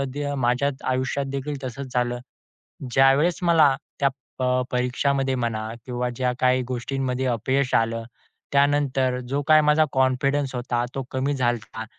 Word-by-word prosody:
The 145 0 -2
माझ्याच 130 +3 0
आयुष्यातदेखील 135 +2 -2
तसंच 130 0 -6
झालं. 120 0 0 0.7
ज्यावेळेस 135 +7 +4
मला 160 -5 +5 0.3
त्या 140 - +4 0.3
प - - -3 0.3
परीक्षामध्ये 130 +2 0
म्हणा 115 -3 -2 0.2
किंवा 125 0 -2
ज्या 125 0 0
काही 130 0 +3
गोष्टींमध्ये 130 +1 -2
अपयश 130 +3 0
आलं. 115 0 +1 0.5
त्यानंतर 140 -2 +2
जो 140 +2 0
काही 155 0 +7
माझा 150 +1 +4
कॉन्फिडन्स 130 +1 +1
होता, 120 -1 -1
तो 135 - -2
कमी 135 +2 -1
झाला 120 -4 -2
होता. 110 - -3
130 Hz, 135 wpm, -24 LUFS, 125-140 Hz, 0.7 s, काही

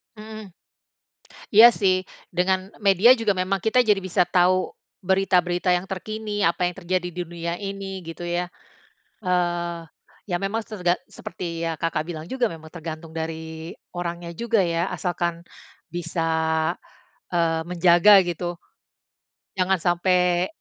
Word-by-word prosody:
Mmm. 215 0 -9 1.1
Iya 220 +3 +11
sih, 190 -2 +4 0.3
dengan 185 +1 0 0.2
media 195 +4 +6
juga 225 -3 +1
memang 185 +1 0
kita 225 +3 +3
jadi 215 -4 +4
bisa 180 -1 +1
tahu 185 +1 +3 0.3
berita-berita 180 -1 +2
yang 180 +1 0
terkini, 210 +2 -4
apa 175 +1 +2
yang 175 - -2
terjadi 180 -1 -1
di 180 - -3
dunia 170 0 -5
ini, 195 -1 -6
gitu 165 +1 -7
ya. 175 +1 -2 0.7
Eee, 175 -3 -1 0.5
ya 175 - +1
memang 215 +3 -2
tergan 180 -5 0
seperti 170 -2 -5
yang 165 -1 -2
Kakak 160 -1 -2
bilang 155 -2 -5
juga 255 -2 +1
memang 160 -3 -10
tergantung 160 -1 -7
dari 160 0 -6 0.2
orangnya 175 -1 -4
juga 225 +2 +1
ya, 170 +2 0
asalkan 175 -2 -2 0.5
bisa, 170 -1 -3 1.1
eee 165 -1 +1
menjaga 180 +3 +6
gitu, 175 0 -4 1.0
jangan 185 +1 +2
sampai. 180 +1 +2
180 Hz, 130 wpm, -24 LUFS, 170-195 Hz, 1.1 s, Iya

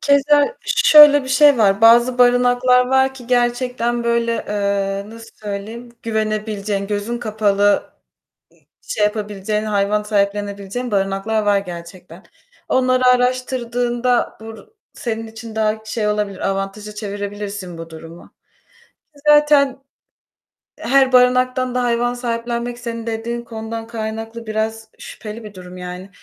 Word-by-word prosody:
Keza 290 - +3
şöyle 295 -1 +7
bir 260 - -8
şey 285 -1 +5
var: 200 -1 +3
Bazı 235 +2 +5
barınaklar 245 0 +4
var 265 +1 +2
ki 250 -3 -12
gerçekten 240 -1 0
böyle, 235 0 +1 0.2
eee, 200 0 -2
nasıl 230 0 -12
söyleyeyim 215 +3 -7
güvenebileceğin, 215 -2 -2
gözün 210 +3 -3
kapalı 210 -3 0
ı - - 0 1.1
şey - - 0
yapabileceğin, 210 0 -2
hayvan 210 0 0
sahiplenebileceğin 205 +2 -2
barınaklar 195 +2 -1
var 205 -1 +2
gerçekten. 175 -1 -10 0.5
Onları 255 0 +2
araştırdığında 250 -1 0
bu 225 0 -11 0.3
senin 225 -1 -4
için 220 0 -10
daha 220 0 -1
şey 220 -1 -2
olabilir, 210 -2 -2
avantaja 195 +2 -4
çevirebilirsin 205 -3 -6
bu 165 0 -9
durumu. 165 +1 -12 0.9
Ki 290 - -19
zaten 295 -2 +4 1.0
her 265 +1 +3
barınaktan 255 0 +3
da 250 - +1
hayvan 240 0 0
sahiplenmek 240 0 -4
senin 230 -1 -6
dediğin 230 +1 -3
konudan 225 0 -7
kaynaklı 225 0 -6
biraz 220 +1 -3
şüpheli 220 0 -9
bir 210 - -10
durum 180 -1 -11
yani. 180 +1 -8
225 Hz, 120 wpm, -19 LUFS, 205-245 Hz, 1.1 s, şöyle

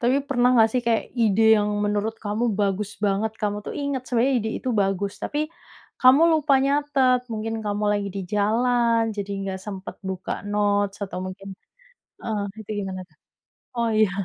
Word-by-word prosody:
Tapi 245 +3 +3
pernah 245 -2 +3
nggak 225 -1 +6
sih 250 - +1
kayak 230 -1 +2 0.2
ide 220 -1 +3 0.2
yang 210 0 0 0.2
menurut 205 +2 -1
kamu 210 +2 -1
bagus 200 0 0
banget, 205 +2 0
kamu 205 -1 -1
tuh - - -5
ingat 280 -3 -2
sebenarnya 250 +3 +2
ide 220 -1 -3
itu 260 - -5
bagus. 195 -1 0
Tapi, 295 - -2 0.6
kamu 260 +5 +7
lupa 300 -2 +3
nyatet, 275 -3 +2
mungkin 225 +1 -3
kamu 205 0 -1
lagi 205 -1 -1
di - - -2
jalan 230 +2 +2
jadi 200 -1 -4
nggak 190 -1 -4
sempet 195 -2 -7
buka 185 -1 -4 0.2
notes 205 -1 +1
atau 185 -2 -6
mungkin 195 +1 -8 0.7
heeh, 215 -2 -2 0.2
itu 215 - -11
gimana 190 -1 -5
tuh? 155 - -32 0.6
Oh, 235 -1 +1
iya. 215 -2 +4
215 Hz, 170 wpm, -24 LUFS, 200-245 Hz, 0.7 s, kamu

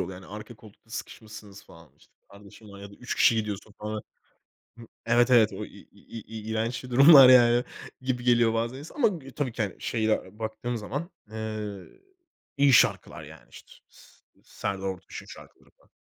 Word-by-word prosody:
yol - - -3
yani. 90 0 -11
Arka 105 +3 -10
koltukta 110 +1 -19
sıkışmışsınız 110 -3 -10
falan, 85 -4 -18
işte. - - -26 0.2
Kardeşin 100 +2 -16
var 100 0 -12
ya 100 0 -10
da - - -14
3 125 - -6
kişi 120 - +4
gidiyorsun 105 -1 -4
falan. 105 0 -5 0.8
Hı 115 - -12 0.2
Evet, 120 +2 +3
evet. 115 -3 +5
O - - -6
i - - -11
i - - -15
i 115 - -11
i 110 +1 -9
i 110 +1 -8
iğrenç 115 +3 -3
bir 125 - -10
durumlar 135 +1 +9
yani 120 -1 +6 0.4
gibi 130 -1 -3
geliyor 120 -2 +3
bazen 115 +3 -2
insana 150 - -12
ama 240 -5 +4
gü 155 -9 -8
tabii 135 -5 -3
ki, 115 - -3
hani, 100 -3 -4
şeyde 110 -2 -2
baktığım 110 +2 -4
zaman, 140 - -5 0.2
ııı, 110 -3 -6 0.7
iyi 140 -1 +4
şarkılar - - +2
yani. - - -15
İşte, - - -15 0.2
s - - -19 0.4
Serdar 95 -1 -5
Ortaç'ın 95 0 -7
şarkıları - - -15
falan. - - -32
110 Hz, 185 wpm, -26 LUFS, 105-125 Hz, 0.8 s, durumlar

